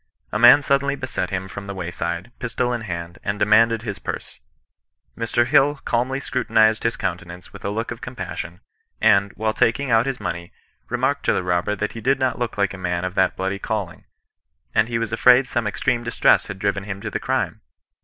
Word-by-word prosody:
A 105 Hz, -, -1 dB
man 120 Hz, +5 st, +8 dB
suddenly 140 Hz, 0 st, +1 dB
beset 130 Hz, -9 st, -3 dB
him 95 Hz, 0 st, -3 dB
from 100 Hz, +2 st, -8 dB
the 100 Hz, -, -5 dB
wayside, 85 Hz, +2 st, -4 dB
pistol 125 Hz, 0 st, -1 dB
in 120 Hz, -, -2 dB
hand, 85 Hz, -4 st, -6 dB
and 100 Hz, +1 st, -2 dB
demanded 115 Hz, +2 st, +4 dB
his 100 Hz, -4 st, -5 dB
purse. -, -, -6 dB, 0.8 s
Mr. 115 Hz, +1 st, +1 dB
HUl 145 Hz, +2 st, +4 dB
calmly 125 Hz, +3 st, 0 dB
scrutinized 110 Hz, -4 st, +2 dB
his 115 Hz, -, -1 dB
countenance 90 Hz, -2 st, -5 dB
with -, -, -11 dB
a 100 Hz, -, -1 dB
look 115 Hz, +3 st, -3 dB
of 120 Hz, -, -7 dB
compassion, 95 Hz, -7 st, -6 dB, 0.4 s
and, 100 Hz, -2 st, +4 dB
while 110 Hz, 0 st, -1 dB
taking 120 Hz, +5 st, +1 dB
out 115 Hz, +3 st, +4 dB
his 135 Hz, -2 st, -2 dB
money, 85 Hz, 0 st, -5 dB, 0.4 s
remarked -, -, 0 dB
to -, -, +3 dB
the -, -, -1 dB
robber 90 Hz, +3 st, 0 dB
that 105 Hz, +1 st, -2 dB
he 115 Hz, -, -8 dB
did 135 Hz, +4 st, +2 dB
not 130 Hz, -2 st, 0 dB
look 120 Hz, -3 st, -3 dB
like 100 Hz, -1 st, +1 dB
a 95 Hz, -, -9 dB
man 90 Hz, -1 st, -2 dB
of 90 Hz, -, -3 dB
that 95 Hz, -1 st, +2 dB
bloody 95 Hz, +1 st, -2 dB
calling, 100 Hz, -5 st, -4 dB, 0.7 s
and 110 Hz, +1 st, +3 dB
he 120 Hz, -1 st, -1 dB
was 115 Hz, -1 st, -3 dB
afraid 125 Hz, +3 st, +5 dB
some 120 Hz, -4 st, -1 dB
extreme 120 Hz, +3 st, 0 dB
distress 115 Hz, -, +3 dB
had 100 Hz, -, -6 dB
driven 100 Hz, 0 st, -1 dB
him 100 Hz, -1 st, -5 dB
to -, -, -5 dB
the -, -, -2 dB
crime. -, -, -2 dB
110 Hz, 205 wpm, -22 LUFS, 95-120 Hz, 0.8 s, man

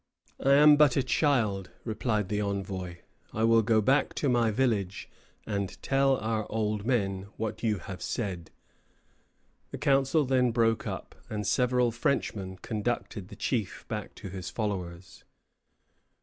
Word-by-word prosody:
"I 135 Hz, -, +5 dB
am 150 Hz, +1 st, +7 dB
but 145 Hz, -3 st, +5 dB
a 135 Hz, -, +3 dB
child," 115 Hz, -, +1 dB
replied 110 Hz, -3 st, -1 dB
the 105 Hz, 0 st, 0 dB
envoy. 95 Hz, -3 st, -4 dB, 0.3 s
"I 110 Hz, -, 0 dB
will 115 Hz, 0 st, +5 dB
go 110 Hz, 0 st, +3 dB
back 135 Hz, +7 st, +2 dB
to 145 Hz, -, 0 dB
my 120 Hz, -2 st, +3 dB
village, 105 Hz, -5 st, 0 dB, 0.4 s
and 100 Hz, -3 st, -3 dB
tell 135 Hz, -1 st, +3 dB
our 110 Hz, -1 st, -2 dB
old 105 Hz, -1 st, -1 dB
men 100 Hz, -6 st, 0 dB
what 110 Hz, -1 st, -4 dB
you 110 Hz, -3 st, +1 dB
have 95 Hz, +1 st, -8 dB
said." 95 Hz, -7 st, -3 dB, 1.2 s
The -, -, -6 dB
council 140 Hz, +2 st, +2 dB
then 125 Hz, -1 st, +3 dB
broke 115 Hz, -1 st, +1 dB
up, -, -, -6 dB, 0.2 s
and 105 Hz, -1 st, -3 dB
several 125 Hz, +3 st, +2 dB
Frenchmen 105 Hz, -6 st, -2 dB
conducted 105 Hz, -3 st, -3 dB
the 105 Hz, -, -11 dB
chief 110 Hz, -2 st, -2 dB
back 105 Hz, -3 st, -5 dB
to 100 Hz, -, -8 dB
his 95 Hz, 0 st, -6 dB
followers. 90 Hz, -5 st, -5 dB
110 Hz, 145 wpm, -29 LUFS, 100-125 Hz, 1.2 s, am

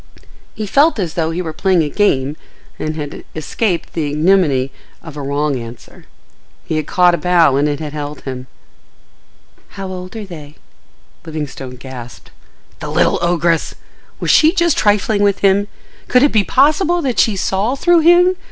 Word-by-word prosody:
He 215 Hz, -, -4 dB
felt 285 Hz, +9 st, +3 dB
as 175 Hz, -6 st, -3 dB
though 165 Hz, -3 st, -1 dB
he 170 Hz, +2 st, -3 dB
were 160 Hz, -2 st, -5 dB
playing 180 Hz, 0 st, +2 dB
a -, -, -2 dB
game 145 Hz, -8 st, +1 dB, 0.4 s
and 155 Hz, 0 st, -3 dB
had 145 Hz, -2 st, -6 dB
escaped 170 Hz, +4 st, -2 dB
the 155 Hz, -3 st, -2 dB
ignominy 150 Hz, -4 st, +2 dB, 0.3 s
of 160 Hz, -3 st, -10 dB
a 145 Hz, -, -5 dB
wrong 140 Hz, 0 st, -1 dB
answer: 115 Hz, 0 st, -11 dB, 0.6 s
he 160 Hz, -, -2 dB
had 155 Hz, -, -3 dB
caught 180 Hz, -1 st, +3 dB
a 170 Hz, -, -1 dB
bough 170 Hz, -6 st, +3 dB
and 145 Hz, +2 st, +2 dB
it 145 Hz, -1 st, -3 dB
held 150 Hz, -1 st, -6 dB
him. 130 Hz, -1 st, -7 dB, 1.3 s
"How 195 Hz, -1 st, -5 dB
old 185 Hz, +2 st, -8 dB
are 220 Hz, -2 st, -6 dB
they?" 155 Hz, -5 st, -11 dB, 0.7 s
Livingstone 145 Hz, -5 st, -6 dB
gasped. 125 Hz, -1 st, -11 dB, 0.5 s
The -, -, -6 dB
little -, -, +2 dB
ogress! 170 Hz, -1 st, 0 dB, 0.4 s
Was -, -, +1 dB
she 315 Hz, +2 st, +5 dB
just 340 Hz, -4 st, +2 dB
trifling 205 Hz, 0 st, +1 dB
with 200 Hz, -1 st, +1 dB
him? 200 Hz, +1 st, +3 dB, 0.4 s
Could 250 Hz, +1 st, +4 dB
it 290 Hz, -, +4 dB
be 215 Hz, -2 st, +3 dB
possible 305 Hz, -, +2 dB
that 255 Hz, -4 st, -1 dB
she 220 Hz, -, +3 dB
saw 195 Hz, +6 st, -1 dB
through 345 Hz, +4 st, +3 dB
him? 350 Hz, +3 st, +5 dB
175 Hz, 165 wpm, -17 LUFS, 150-210 Hz, 1.3 s, she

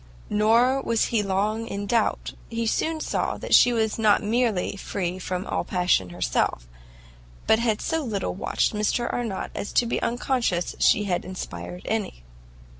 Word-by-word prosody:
Nor 235 Hz, +6 st, +3 dB
was 230 Hz, -3 st, +1 dB
he 235 Hz, -, -1 dB
here 205 Hz, -2 st, 0 dB
long 210 Hz, +4 st, 0 dB
in 200 Hz, -1 st, -4 dB
doubt; 225 Hz, +1 st, 0 dB, 0.2 s
he 230 Hz, 0 st, -2 dB
soon 315 Hz, +7 st, 0 dB
saw -, -, -1 dB
that -, -, -4 dB
she 245 Hz, -, +7 dB
was 220 Hz, -2 st, 0 dB
not 215 Hz, -1 st, +4 dB
merely 220 Hz, -4 st, 0 dB
free 185 Hz, -2 st, -3 dB
from 185 Hz, 0 st, -3 dB
all -, -, -1 dB
passion 180 Hz, -, +1 dB
herself, -, -, -1 dB, 0.8 s
but 220 Hz, -, +4 dB
had 225 Hz, -3 st, 0 dB
so 325 Hz, 0 st, -1 dB
little 210 Hz, -6 st, -2 dB
watched 190 Hz, -, 0 dB
Mr 215 Hz, +3 st, 0 dB
Arnott 225 Hz, -6 st, -3 dB
as 205 Hz, -, -5 dB
to 245 Hz, -, +3 dB
be 235 Hz, -, -1 dB
unconscious 235 Hz, -7 st, 0 dB
she 210 Hz, -, +4 dB
had 180 Hz, -4 st, -1 dB
inspired 180 Hz, -, -7 dB
any. 210 Hz, -, -3 dB
210 Hz, 165 wpm, -25 LUFS, 185-235 Hz, 0.8 s, she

